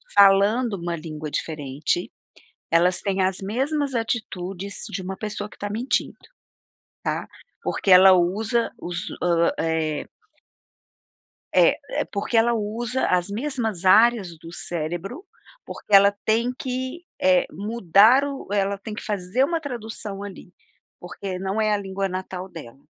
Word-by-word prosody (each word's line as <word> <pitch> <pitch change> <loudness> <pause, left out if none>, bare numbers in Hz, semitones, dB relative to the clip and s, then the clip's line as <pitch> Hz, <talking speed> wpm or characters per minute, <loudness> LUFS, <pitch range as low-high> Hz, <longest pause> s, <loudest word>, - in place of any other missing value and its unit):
falando 200 +4 +5
uma 170 -2 -3
língua 155 -1 -7
diferente, 150 +3 -2 0.6
elas 175 +2 +4
têm 195 -1 0
as 185 0 0
mesmas 270 +8 -1
atitudes 200 -4 -3
de 200 -1 -4
uma 190 +1 -5
pessoa 210 -1 -4
que - - -16
tá 205 - -4
mentindo, 230 +6 -1 0.9
tá? - - -2 0.4
Porque 195 - 0
ela 190 +1 +9
usa 205 +6 +1
os, 175 0 -4 0.2
ah, 170 -1 +3
eh 160 -2 -1 1.5
É, - - +5 0.3
porque 205 +3 -4
ela 235 +1 +4
usa 230 +4 -1
as 180 0 +1
mesmas 225 - -2
áreas 200 -3 +4
do 165 +1 -11
cérebro, 175 - -4 0.4
porque 210 - -3
ela 200 +1 +8
tem 230 +3 +2
que, 260 +3 -4 0.2
eh, 275 -1 +4
mudar, 210 - +4 0.3
ela 200 0 0
tem 210 +2 -7
que - - -7
fazer 205 +4 0
uma 330 +3 -1
tradução 220 -7 -6
ali, 195 -3 -9 0.5
porque 185 +1 -6
não 195 +3 -2
é 215 -1 +2
a - - +3
língua 195 -1 -3
natal 185 0 -5
dela. 145 -8 -11
200 Hz, 135 wpm, -23 LUFS, 180-225 Hz, 1.5 s, ela